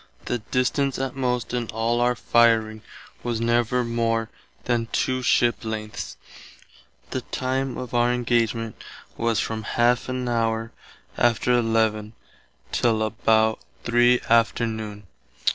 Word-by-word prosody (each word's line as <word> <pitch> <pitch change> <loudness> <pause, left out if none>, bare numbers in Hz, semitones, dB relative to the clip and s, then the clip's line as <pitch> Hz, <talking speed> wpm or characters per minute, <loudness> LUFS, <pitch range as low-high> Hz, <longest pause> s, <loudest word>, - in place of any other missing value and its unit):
The 120 - -1
distance 130 +4 0
att 135 -1 -3
most 125 -2 -1
in 120 -2 -1
all 115 +1 0
our 125 0 +2
fireing 115 -2 +3 0.4
was 120 -2 -2
never 120 +1 +1
more 115 -1 -1 0.3
than 120 -2 0
two 130 0 0
ships 120 -1 +2
length; 110 -1 -5 1.0
the - - -2
time 130 0 -2
of 125 -2 -6
our 120 0 +3
engagement 115 -2 -1 0.3
was 115 -3 0
from 110 -1 -3
½ 120 +3 +1
an 130 -1 -2
hour 115 -1 0 0.5
after 120 +1 +3
11 110 -2 +1 0.6
till 110 -2 +2
about 110 0 +2 0.2
3 120 +1 +4
afternoon. 110 -2 0
115 Hz, 120 wpm, -24 LUFS, 110-125 Hz, 1.0 s, 3